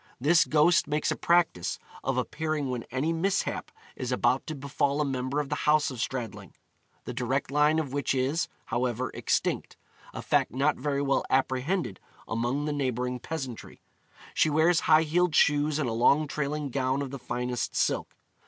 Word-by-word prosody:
This 165 +6 +4
ghost 155 +2 +4
makes 150 +1 0
a - - 0
practice 170 - +1 0.3
of - - -1
appearing 155 -4 -2
when 120 -2 -4
any 140 +6 -1
mishap 185 +4 -1 0.3
is - - -4
about - - +1
to 155 - -4
befall 140 +1 -1
a 150 - +2
member 130 +1 -2
of 145 -2 -3
the - - -1 0.2
house 150 -1 +3
of 125 - -8
Stradling 120 -6 -5 0.5
the - - -5
direct 125 +3 -1
line 150 +2 +3
of 145 -5 -2
which 140 -1 0
is, 135 +6 0 0.2
however, 125 0 -1
extinct, - - -1 0.3
a - - -7
fact - - +1
not 140 +4 +2
very 140 -1 -1
well 140 -1 +1
apprehended 130 - 0 0.3
among 120 +6 -1
the 150 - -1
neighbouring 125 -3 -2
peasantry. 130 -4 -6 0.5
She - - +3
wears 160 +3 +4
high 155 +1 +5
heeled 170 +1 +1
shoes 150 0 +3
and 150 -4 0
a 115 - -1
long 140 +6 +3
trailing 145 -1 -3
gown 130 +1 0
of 135 - -6
the 140 - -6
finest 125 0 -3
silk. - - 0
140 Hz, 170 wpm, -28 LUFS, 130-155 Hz, 0.5 s, high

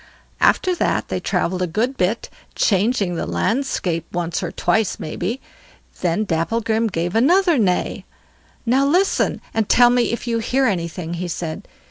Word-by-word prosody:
After 370 - +3
that - - 0
they - - -1
travelled 185 +1 -1
a 180 - +1
good 230 +11 -1
bit, 205 +2 0 0.3
changing 200 -2 +1
the 170 - -3
landscape 165 - -1
once 175 -1 -2
or 175 -3 -3
twice, 220 -3 0
maybe. 185 +10 -3 0.6
Then 180 +4 0
Dapplegrim 220 +6 0
gave 175 -2 -2
another 335 - +4
neigh. 180 -5 0 0.6
"Now 255 +4 +3
listen, 360 +8 +2
and 220 -2 0
tell 245 0 +6
me 245 -1 +2
if 235 - -4
you 230 -1 0
hear 260 +4 +1
anything", 170 -4 -2
he 175 +1 -3
said. 165 -2 -5
215 Hz, 150 wpm, -20 LUFS, 175-245 Hz, 0.6 s, tell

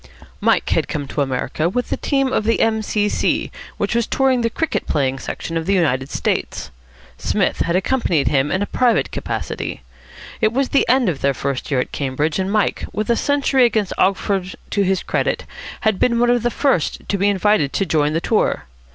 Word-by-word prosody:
'" - - -24
Mike - - +2
had - - +1
come 145 -2 -4
to 145 - -2
America 135 +4 -1
with 245 +6 -2
a - - +2
team 275 -2 0
of - - +1
the 230 +2 +1
M.C.C. 215 -2 0 0.3
which - - -1
was 235 -1 +1
touring 265 -2 +2
the 230 - +1
cricket 320 +7 -2
playing 135 -2 0
section 165 - -5
of 165 +1 -3
the 200 - +3
United 135 -7 +1
States. - - -2 0.5
Psmith - - 0
had 170 - 0
accompanied 185 - +1
him 140 0 +2
in 190 +2 +1
a - - -1
private 245 +2 +1
capacity. - - -4 0.6
It 220 -1 +3
was 265 +2 0
the 275 - +2
end 255 -1 +4
of 160 -7 -1
their 140 -1 +1
first 140 0 -3
year 135 -4 +1
at 125 - -2
Cambridge, 145 +4 -1
and 190 +1 -1
Mike, 210 -1 +1
with 215 +2 -1
a - - +4
century 280 -1 +2
against 220 -5 +1
Oxford 190 -1 +1 0.2
to 205 - +1
his 190 -1 +1
credit, - - -1 0.4
had 215 -3 +1
been 235 -1 +2
one 240 +1 +3
of 245 -1 +2
the 240 - +1
first 255 - 0
to 200 - -1
be 200 +2 +3
invited 200 -7 +2
to 195 - +1
join 150 -3 +1
the 165 - 0
tour. 215 - +1
200 Hz, 205 wpm, -20 LUFS, 150-235 Hz, 0.6 s, end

